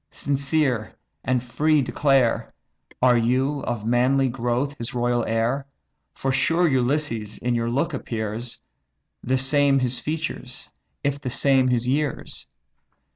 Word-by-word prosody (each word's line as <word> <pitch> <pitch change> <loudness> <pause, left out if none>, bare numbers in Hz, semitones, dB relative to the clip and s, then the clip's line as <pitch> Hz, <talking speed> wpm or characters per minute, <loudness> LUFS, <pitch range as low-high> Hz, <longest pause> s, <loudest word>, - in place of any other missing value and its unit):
sincere 140 -5 0 0.3
and 125 -1 0
free 150 +6 +2
declare, 135 -3 +2 0.5
Are 125 -2 +5
you, 130 +5 +1
of 115 -3 -3
manly 130 +3 +3
growth, 125 +3 -1
his 115 +1 -5
royal 120 0 +1
heir? 115 +5 0 0.5
For 135 - -1
sure 165 +6 +2
Ulysses 125 -5 0
in 125 +1 -1
your 115 0 0
look 140 +7 0
appears, 115 -2 -4 0.6
The 130 +2 +1
same 140 +1 +3
his 125 -1 0
features, 155 -5 -5 0.3
if 140 0 -1
the 130 - -3
same 130 +1 +3
his 125 -1 +1
years. 145 +2 -2
130 Hz, 130 wpm, -24 LUFS, 120-140 Hz, 0.6 s, Are